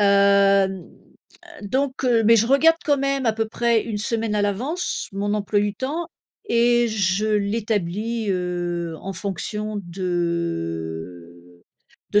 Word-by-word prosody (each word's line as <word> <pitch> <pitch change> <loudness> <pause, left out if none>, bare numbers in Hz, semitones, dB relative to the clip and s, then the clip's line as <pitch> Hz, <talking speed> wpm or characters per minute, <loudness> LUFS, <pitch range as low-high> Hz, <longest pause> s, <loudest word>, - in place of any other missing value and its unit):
Heu, 205 - +4
n 200 -1 +4 0.9
heu - - -6
donc 265 +1 -1
heu, 230 -3 +3
mais 230 +2 +6
je 225 +1 +3
regarde, 325 +4 +5
quand 290 -2 +2
même, 275 -2 0
à 225 - +3
peu 225 0 -1
près 235 -1 +1
une 220 -3 -4
semaine 225 0 -1
à 205 - +1
l'avance, 255 - -2
mon 205 +1 -2
emploi 205 0 0
du 205 0 0
temps 305 +6 -3 0.4
et 240 0 +3
je 200 -1 0
l'établis 215 +1 -1
heu, 175 -2 -2
en 195 - -5
fonction 205 +3 -4
de 90 - -4 0.5
de 205 - +4
205 Hz, 145 wpm, -22 LUFS, 180-230 Hz, 0.9 s, mais